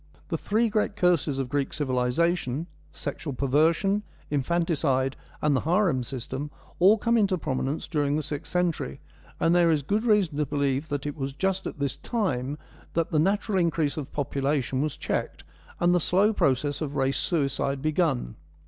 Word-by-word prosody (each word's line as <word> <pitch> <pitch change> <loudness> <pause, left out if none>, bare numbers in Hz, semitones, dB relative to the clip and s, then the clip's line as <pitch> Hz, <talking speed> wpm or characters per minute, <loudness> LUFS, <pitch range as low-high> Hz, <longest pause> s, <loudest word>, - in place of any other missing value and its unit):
The - - 0
three 225 +3 +1
great 210 -1 0
curses 175 -8 +2
of 135 -2 -1
Greek 140 +1 -1
civilisation 140 +2 0
— 150 0 -30
sexual 150 -1 -5
perversion, 160 +10 +2 0.3
infanticide, 145 -3 +1 0.3
and 150 -2 +3
the - - +3
harem 170 -5 +2
system 130 +4 -5 0.2
— - - -26
all 195 +5 +6
come 235 +2 +2
into 195 -3 +2
prominence 140 -1 -2
during 145 -3 0
the 155 - -1
sixth 145 0 -6
century, 180 -2 -1 0.4
and 165 - +3
there 175 -1 +5
is 155 -3 +2
good 210 +10 0
reason 205 -10 +2
to 150 - +1
believe 140 +1 0
that 145 0 -3
it 145 - -3
was 135 -2 -4
just 190 +5 -1
at - - -6
this 140 -1 -2
time 145 - -2 0.4
that 165 -1 0
the 155 - +2
natural 195 +3 +1
increase 165 -4 +1
of 150 -2 -5
population 140 -2 -1
was 150 -1 -2
checked, - - -3 0.4
and 175 0 +4
the 180 - +4
slow 195 +6 +3
process 145 - +1
of 145 -2 -3
race 135 0 +1
suicide 140 -4 0
begun. 155 - +1
150 Hz, 175 wpm, -26 LUFS, 140-175 Hz, 0.4 s, all